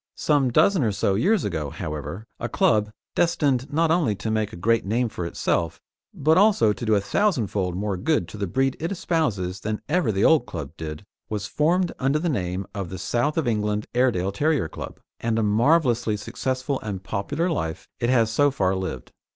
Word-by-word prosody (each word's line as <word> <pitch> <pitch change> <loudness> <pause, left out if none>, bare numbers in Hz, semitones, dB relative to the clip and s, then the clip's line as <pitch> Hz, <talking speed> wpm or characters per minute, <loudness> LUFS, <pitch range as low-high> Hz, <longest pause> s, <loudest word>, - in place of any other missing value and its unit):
Some 145 -4 +2
dozen 175 +6 +4
or 110 - +2
so 100 0 +1
years 190 - +2
ago, 80 -7 -2
however, 75 +8 -6
a 115 - -3
club, 105 -1 +2 0.2
destined 145 -6 +1
not 160 +2 +2
only 160 -11 +2
to 110 +3 -3
make 110 -1 0
a - - -8
great 115 +6 +2
name 115 +4 0
for 90 -5 -4
itself, 85 -1 -1 0.3
but 160 +5 +3
also 190 - +4
to 120 - -6
do 110 - +4
a - - +4
thousandfold 100 - 0
more 100 0 -2
good 150 - 0
to - - -9
the 100 -1 -2
breed 135 +7 +1
it 165 +4 -2
espouses 115 - -1
than 110 +1 -3
ever 180 -10 +1
the 100 +1 +1
old 155 -6 +4
club 75 -6 -6
did, 80 +3 -7 0.2
was 105 -2 -3
formed 170 - +1
under 135 +2 +2
the 170 +3 -1
name 95 - -2
of 100 -4 -4
the 95 - -6
South 120 - -1
of 160 -6 +1
England 105 -2 0
Airedale 120 -7 +2
Terrier 145 - +1
Club, - - -8 0.2
and 115 -1 0
a 115 - +2
marvellously 115 0 +2
successful 130 +5 -2
and 100 -3 -5
popular 145 - -2
life 80 - -3
it 120 - 0
has 115 -3 +3
so 145 +5 +4
far 95 -9 0
lived. 95 -9 -4
110 Hz, 195 wpm, -24 LUFS, 95-145 Hz, 0.3 s, dozen